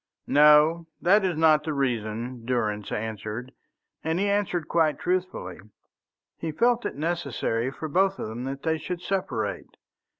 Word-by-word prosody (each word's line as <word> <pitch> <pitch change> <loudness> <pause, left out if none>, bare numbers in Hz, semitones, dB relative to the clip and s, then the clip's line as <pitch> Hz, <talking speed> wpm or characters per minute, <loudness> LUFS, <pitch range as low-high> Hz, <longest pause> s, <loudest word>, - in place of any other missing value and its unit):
"No, 150 +3 +5
that 200 +4 +4
is 180 -4 0
not 155 -1 +5
the 155 0 -2
reason," 120 -2 -2
Durrance 110 -4 -1
answered, 110 +3 -4 0.5
and 160 +2 0
he 200 - +1
answered 200 -5 0
quite 160 -3 +2
truthfully. 180 - -2 0.8
He 165 - -3
felt 240 +7 +2
it - - -7
necessary 140 -7 -1
for 155 +4 -6
both 190 +5 +2
of - - -4
them 115 +3 -6
that 135 +1 -5
they 160 -1 0
should 180 +2 -5
separate. 180 - -3
150 Hz, 145 wpm, -26 LUFS, 120-175 Hz, 0.8 s, No